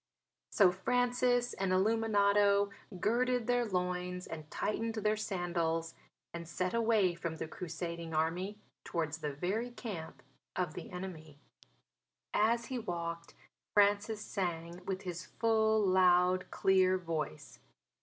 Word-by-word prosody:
So 195 -4 +5
Francis 245 +4 +1
and 190 -1 -1
Illuminato 200 0 +3 0.3
girded 245 +3 +1
their 245 0 +2
loins 180 -2 -2
and 155 -2 -8
tightened 225 +5 -2
their 215 0 +1
sandals 170 -5 -1 0.4
and 170 -1 -6
set 185 +2 -2
away 220 -5 +3
from 170 -1 -4
the 160 - -4
Crusading 170 0 -5
Army 170 +6 -1 0.3
towards 160 -2 -2
the 150 -2 -2
very 195 - -2
camp 205 -9 -7 0.3
of 180 -4 -1
the - - -7
enemy. 175 -5 -7 1.0
As 235 +2 +2
he 255 0 -3
walked 170 -5 -4 0.4
Francis 205 +1 +3
sang 175 -2 -3
with 190 -1 -2
his 175 -1 -5
full, 220 -1 +2
loud, 185 -2 +4
clear 185 -1 +3
voice. 160 - -4
185 Hz, 120 wpm, -33 LUFS, 170-215 Hz, 1.0 s, So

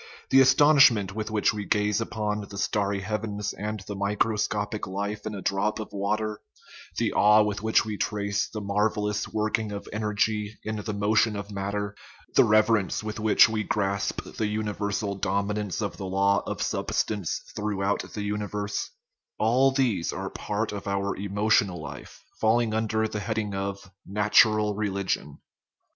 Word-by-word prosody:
The 135 - +8
astonish 145 +2 +7
ment 100 -5 -3
with 110 +1 -4
which 110 +1 +2
we 105 -1 -4
gaze 105 +1 +1
upon 105 -2 -2
the 100 - -8
starry 100 0 0
heavens 105 0 -3
and 105 +1 -4
the 100 +2 -7
microscopic 105 +1 -1
life 100 +3 -4
in 105 - -4
a 95 - -7
drop 100 +3 0
of 110 - -7
water, 105 +1 -2 0.6
the - - 0
awe 105 +1 +6
with 105 0 -2
which 110 0 +3
we 105 -1 -4
trace 100 -1 -1
the 105 - -5
marvellous 105 0 0
working 110 0 -1
of 100 0 -6
energy 105 0 -1
in 110 0 -3
the 105 +1 -4
motion 105 +1 +2
of 100 0 -6
matter, 100 +1 -3 0.4
the - - +6
reverence 110 -1 +3
with 110 0 -5
which 110 0 +6
we 110 -1 -1
grasp 100 -2 -1
the 110 - -3
universal 105 -1 -2
dominance 100 +1 -1
of 100 - -4
the 95 - -5
law 100 +1 +2
of - - -2
substance 100 -6 -1 0.2
throughout 100 -1 -1
the 105 - -3
universe 105 0 -3 0.5
all 125 +5 +4
these 130 -10 0
are - - -5
part 105 +1 -3
of 100 -1 -6
our 100 0 -1
emotional 100 -1 +1
life, 75 -1 -10 0.2
falling 110 0 +2
under 110 0 0
the 110 - -4
heading 110 -1 -2
of 95 -1 -4
" - - -65
natural 105 +1 +4
religion." 100 -8 -2
105 Hz, 160 wpm, -26 LUFS, 100-110 Hz, 0.6 s, The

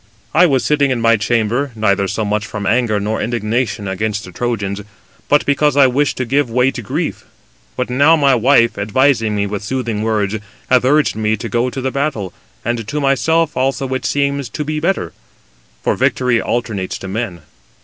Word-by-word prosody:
I 175 +3 +6
was 135 -4 +1
sitting 145 -2 +2
in 130 -2 0
my 115 0 +4
chamber, 120 +5 0
neither 100 -3 +1
so 105 +3 -2
much 105 0 -1
from 105 -2 -5
anger 110 -1 +1
nor 105 +2 -2
indignation 115 -1 -1
against 105 +2 -2
the 90 - -10
Trojans, 105 -1 -3 0.5
but 145 - +3
[because] 145 0 +2
I 140 - +7
wished 135 +3 +1
to 130 - -1
give 135 +1 +1
way 125 +3 +2
to 125 - -6
grief. 100 - -3 0.5
But - - -2
now 140 +6 +5
my 140 -3 +3
wife, 120 -1 +3
advising 115 +1 +2
me 100 0 0
with 105 0 -4
soothing 115 -2 -2
words, 110 -1 0 0.3
hath 125 -1 +4
urged 145 -1 +3
me 110 0 0
to - - -5 0.2
the 130 +1 -3
battle, 135 - -2 0.3
and 115 -2 -2
to 150 +4 -2
myself 150 +3 +1
also 135 +1 0
it 130 0 -3
seems 140 -2 -1
to 150 - -4
be 155 +1 -2
better: 180 +5 -1 0.7
for - - +1
victory 125 -2 +1
alternates 110 -6 -2
to 95 - -8
men. 95 -4 -4
120 Hz, 180 wpm, -17 LUFS, 105-140 Hz, 0.7 s, I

